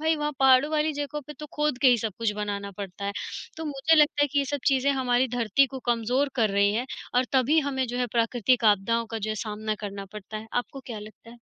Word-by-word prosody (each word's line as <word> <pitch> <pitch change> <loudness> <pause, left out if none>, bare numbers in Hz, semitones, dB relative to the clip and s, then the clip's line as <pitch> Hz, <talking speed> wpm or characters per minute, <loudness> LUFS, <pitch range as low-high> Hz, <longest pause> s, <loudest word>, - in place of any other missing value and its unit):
भाई, 320 0 +2
वहाँ 300 0 -2
पहाड़ों 265 +2 +5
वाली 310 0 +1
जगहों 290 +1 -4
पे 300 - -8
तो 300 - -7
खोद 300 -4 0
के 265 - +7
ही 245 - +5
सब 215 -2 -3
कुछ 225 -2 0
बनाना 200 -1 -3
पड़ता 200 0 -6
है। 200 - -2 0.4
तो 320 - -5
मुझे 300 +2 +2
लगता 295 -1 +4
है - - +4
कि 285 - +2
ये 280 - +2
सब 285 -2 -2
चीज़ें 270 0 +3
हमारी 255 -1 +1
धरती 235 +4 +3
को 265 0 -7
कमज़ोर 240 +4 +1
कर 220 -3 +2
रही 200 +1 +3
हैं 245 +3 -1 0.3
और 250 +1 +4
तभी 270 +4 +3
हमें 265 -2 -1
जो 245 +1 -4
है 250 - +1
प्राकृतिक 235 +1 +2
आपदाओं 230 +4 -1
का 225 - -3
जो 215 +1 -3
है - - -1
सामना 215 +1 -3
करना 200 -1 -5
पड़ता 210 +1 -8
है। 220 +1 -7
आपको 245 +2 -3
क्या 225 -4 -6
लगता 215 +2 -12
है? 240 - -14
245 Hz, 250 wpm, -26 LUFS, 215-280 Hz, 0.4 s, के